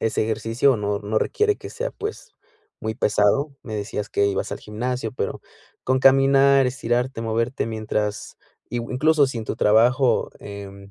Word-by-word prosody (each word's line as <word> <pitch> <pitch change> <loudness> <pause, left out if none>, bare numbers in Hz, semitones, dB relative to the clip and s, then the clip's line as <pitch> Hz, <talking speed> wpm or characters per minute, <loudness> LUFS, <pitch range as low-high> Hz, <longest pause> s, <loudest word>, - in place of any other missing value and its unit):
es 110 - -1
ejercicio 115 +5 +1
o - - 0
no 105 -1 -1
no 105 +1 -1
requiere 425 0 +1
que - - -10
sea, - - -4
pues, 445 +3 -7 0.5
muy 110 0 -3
pesado, 105 +7 +2
me 110 -4 -5
decías 105 0 -4
que 100 - +1
ibas 100 -1 -2
al - - -4
gimnasio, 115 +2 -4
pero 100 - -3 0.4
con 130 0 +1
caminar, 135 0 +5
estirarte, 125 -1 -1
moverte 115 +3 -1
mientras, 105 -2 -3 0.3
i 120 - -2
u 115 - -7
incluso 150 +2 +3
si 125 - -5
en 110 - -5
tu - - -3
trabajo, 120 +5 +3
em, 100 -1 -10
115 Hz, 170 wpm, -23 LUFS, 105-135 Hz, 0.5 s, caminar